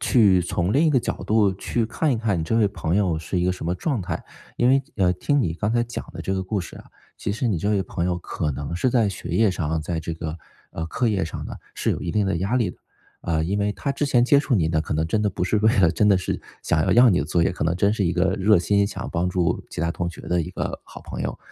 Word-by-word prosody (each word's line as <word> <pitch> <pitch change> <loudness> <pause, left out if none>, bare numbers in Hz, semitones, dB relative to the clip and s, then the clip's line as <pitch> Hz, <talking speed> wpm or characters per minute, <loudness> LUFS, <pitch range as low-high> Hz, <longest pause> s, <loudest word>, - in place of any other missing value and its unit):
去 100 -7 +4
从 90 +2 -1
另 145 +5 +4
一 - - +4
个 130 - +4
角 - - -3
度 105 -3 +3
去 115 +4 -1
看 150 +4 0
一 - - 0
看 110 -5 0
你 80 - -1
这 115 - 0
位 105 -3 +4
朋 85 -2 -2
友 90 -6 +1
是 80 +3 -3
一 90 - +1
个 90 - +2
什 90 - -7
么 85 +2 0
状 135 - -1
态。 90 - -4 0.3
因 120 - +3
为， 135 +1 +4
呃， 90 -3 +3
听 145 +10 +1
你 80 - 0
刚 105 +5 -1
才 120 0 +2
讲 120 0 -5
的 - - -8
这 95 - -2
个 95 -1 -1
故 95 +1 -2
事 85 - -9
啊， - - -12 0.3
其 100 - -3
实 115 +2 -1
你 95 -6 0
这 100 +6 0
位 100 -2 +2
朋 85 0 -3
友 90 -1 0
可 80 -2 -3
能 70 +4 -5
是 125 +8 +1
在 115 -4 +3
学 95 -3 -6
业 100 +4 +3
上， 80 -3 -2
在 85 +1 -3
这 80 +1 -4
个， 80 0 -5 0.3
呃， 80 0 -4
课 120 +8 0
业 95 -5 0
上 80 - -6
呢， - - -6 0.2
是 - - 0
有 - - -2
一 85 - -3
定 105 -1 +2
的 95 -3 0
压 100 +8 -1
力 120 -4 +1
的， - - -17 0.4
呃， 80 -2 0
因 100 +4 -1
为 105 0 0
他 140 - -3
之 145 +1 -1
前 120 -3 +3
接 140 +2 +5
触 140 -3 0
您 80 -5 +2
呢， 80 -1 +1
可 80 - -3
能 80 +1 +1
真 105 +6 0
的 105 - +2
不 90 - -4
是 95 +4 +1
为 110 +3 +3
了 90 -4 +5
真 105 +5 +2
的 100 - +5
是 90 - -3 0.2
想 75 - +1
要 - - +2
要 120 -1 +7
你 90 - +3
的 70 - 0
作 85 +2 +1
业， - - +2
可 90 - -3
能 85 +2 +1
真 100 +3 +2
是 105 -3 0
一 85 - +1
个 95 +1 +2
热 105 -1 +4
心 100 +3 +2
想 - - -5
帮 90 +2 0
助 90 -1 0
其 - - -6
他 85 0 0
同 85 0 -2
学 85 - -9
的 90 -1 0
一 80 - -4
个 - - -4
好 - - -12
朋 - - -6
友。 - - -4
95 Hz, 325 characters per minute, -23 LUFS, 85-110 Hz, 0.4 s, 要